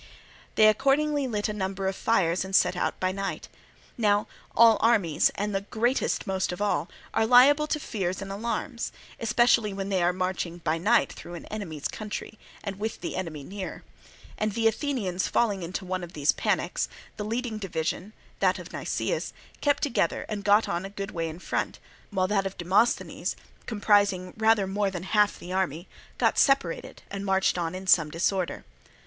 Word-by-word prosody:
They 215 - +6
accordingly 275 +5 +2
lit 210 -4 -1
a 210 - -3
number 195 -1 -3
of 190 - -1
fires 185 -6 +1
and 190 0 -3
set 180 -1 +4
out - - -1
by 185 0 +1
night. 195 +1 -4 0.5
Now 205 -2 +3 0.3
all 230 -1 +7
armies, 205 -10 +3
and 205 +1 -2
the 195 - 0
greatest 235 +5 0
most 190 -1 -1
of 180 - -5
all, 205 -4 0 0.2
are 220 - +2
liable 280 +5 +6
to 305 - -1
fears 190 -9 -3
and 195 0 -6
alarms, 235 +4 -3 0.3
especially 230 -2 +3
when 195 0 -4
they 190 -2 +1
are 175 +1 +3
marching 185 -1 -2
by 165 -1 -1
night 225 +7 +3
through 175 - -9
an 170 - -8
enemy's 170 -9 -4
country 215 0 -6 0.2
and 200 -2 -5
with 220 +1 -3
the - - -4
enemy 160 -6 -4
near; 190 +5 -7 0.6
and 215 -1 0
the 225 +1 +2
Athenians 220 - -1
falling 205 -5 +1
into 180 +3 -4
one 185 0 -3
of 175 - -8
these 145 0 +3
panics, - - -1 0.3
the 210 - -3
leading 225 0 -3
division, 180 +1 -3 0.3
that - - +3
of - - -10
Nicias, - - -2 0.3
kept 285 -1 +2
together 280 -5 0
and 210 -2 -4
got 205 +2 +4
on 170 +1 -2
a 195 - -5
good 200 +1 -6
way 165 -1 -2
in 160 - -8
front, 180 - -2 0.3
while 185 -3 +1
that 195 -1 +1
of 195 - -9
Demosthenes, 190 +7 +1 0.3
comprising 205 -4 +2
rather 220 -2 +3
more 200 +1 0
than 180 -2 -5
half 210 +1 +2
the 180 - -7
army, 180 -2 -1 0.3
got - - +2
separated 275 - +1
and 200 0 -4
marched 190 -1 +2
on 170 0 -2
in 190 +1 -6
some 160 -4 +5
disorder. 180 +3 -1
195 Hz, 180 wpm, -27 LUFS, 185-220 Hz, 0.6 s, all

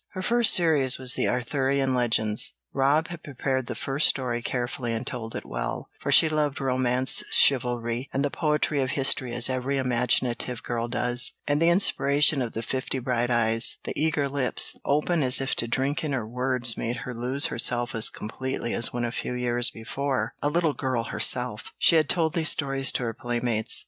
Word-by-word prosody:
Her 185 -1 -5
first 235 +1 +4
series 150 -7 +3
was 130 -1 0
the - - -1
Arthurian 135 +2 0
legends; 110 -4 +1 0.2
Rob 145 +4 +1
had 170 -2 -8
prepared 130 -2 -3
the 120 - -5
first 140 +5 +1
story 120 -3 0
carefully 120 0 -3
and 115 +2 -4
told 115 -2 -6
it - - -6
well, - - -5
for - - -2
she 160 - +7
loved 150 -3 -1
romance, 130 -1 +1
chivalry, 120 -1 +2
and 140 +1 -1
the 145 - -2
poetry 150 -2 0
of 130 - -1
history 130 -2 +2
as 120 0 +3
every 130 +2 -2
imaginative 125 -1 -1
girl 120 -1 -3
does, 120 +1 0
and 145 +1 0
the 165 - +4
inspiration 150 -5 +3
of 120 -2 -4
the 115 - -4
fifty 130 +3 -3
bright 120 -1 -1
eyes, 115 -1 +2
the - - -5
eager 150 -2 0
lips, 135 -2 +2
open 150 +4 0
as 130 -1 +4
if 135 0 -1
to 115 - 0
drink 135 +4 -1
in 150 -3 -2
her 120 -5 -3
words, 125 0 +1
made 115 +1 -3
her 125 - -5
lose 125 +5 0
herself 120 -1 0
as 110 -1 +2
completely 125 +2 -5
as 115 - +1
when 120 -1 -3
a 120 - -3
few 125 - -4
years 120 -1 +2
before, 125 0 -3
a 145 - +1
little 165 -1 0
girl 130 -4 -2
herself, 125 -1 -1
she - - +4
had 155 -3 +2
told 165 -3 +1
these 160 -3 +2
stories 135 -2 +1
to - - -3
her 115 -1 -3
playmates. 120 -1 0
130 Hz, 190 wpm, -25 LUFS, 120-140 Hz, 0.2 s, she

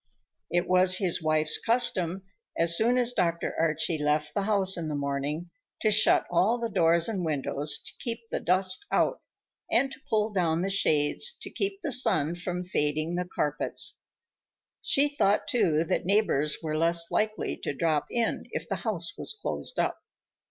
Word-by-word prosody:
It 175 +1 0
was 185 0 +5
his 180 -4 0
wife's 155 -1 +1
custom, 195 -7 0 0.3
as 170 0 +4
soon 235 +6 +3
as 245 -1 +1
Dr. 170 -5 -1
Archie 160 0 0
left 150 0 0
the 200 - -1
house 195 -2 +2
in 170 -2 -4
the 150 - -3
morning, 145 +4 -3 0.3
to 215 - +2
shut 215 +1 +5
all 185 +7 +2
the 235 -1 -3
doors 170 -1 +3
and 200 -5 -3
windows 150 -1 -1
to - - -7
keep 230 -1 -4
the - - -1
dust 185 - +1
out, - - +1 0.5
and 270 - +1
to 270 - -10
pull 215 -1 0
down 170 -3 0
the 195 - -1
shades 160 - +1
to - - -7
keep 395 0 -3
the 305 - -2
sun 165 - +2
from 180 +1 -4
fading 155 -2 -1
the 180 +1 -2
carpets. 150 -1 -2 0.8
She 280 +2 +3
thought, 285 -9 +1
too, 165 - +2
that 165 - -1
neighbors 175 -7 +2
were 155 -1 -2
less 170 +1 +3
likely 215 0 -1
to - - -4
drop 155 +1 -1
in 235 -2 -2
if - - -4
the - - -2
house 180 -8 -1
was 435 - -2
closed - - -5
up. - - -1
175 Hz, 175 wpm, -27 LUFS, 155-215 Hz, 0.8 s, was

